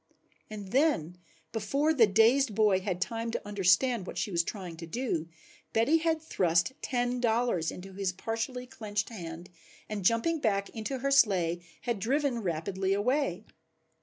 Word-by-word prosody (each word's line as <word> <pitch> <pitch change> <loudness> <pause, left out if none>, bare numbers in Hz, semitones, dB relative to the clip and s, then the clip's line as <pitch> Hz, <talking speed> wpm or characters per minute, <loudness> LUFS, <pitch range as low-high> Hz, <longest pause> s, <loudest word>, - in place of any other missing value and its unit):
And 205 -3 -7
then, 220 - +1 0.3
before 275 +9 +1
the 235 -7 +5
dazed 225 +3 +4
boy 210 -3 +4
had 185 -2 -3
time 230 +4 -2
to 225 - -4
understand 205 +2 +2
what - - -7
she 210 - -1
was 170 -1 +2
trying 180 -3 -6
to 165 0 -8
do, 170 -6 -2 0.4
Betty 230 +9 +4
had 320 -1 0
thrust 175 - +2
ten 245 -1 -1
dollars 230 -8 +1
into 190 +1 -9
his 195 -1 -1
partially 225 +6 -4
clenched 210 -4 -3
hand 175 -4 -8 0.4
and 210 -2 -4
jumping 230 - +2
back 200 -6 0
into 225 +5 -4
her 275 +2 -1
sleigh 185 -10 +3 0.2
had 235 -4 -2
driven 265 +2 0
rapidly 190 +2 -1
away. 220 - 0
215 Hz, 155 wpm, -30 LUFS, 185-250 Hz, 0.4 s, the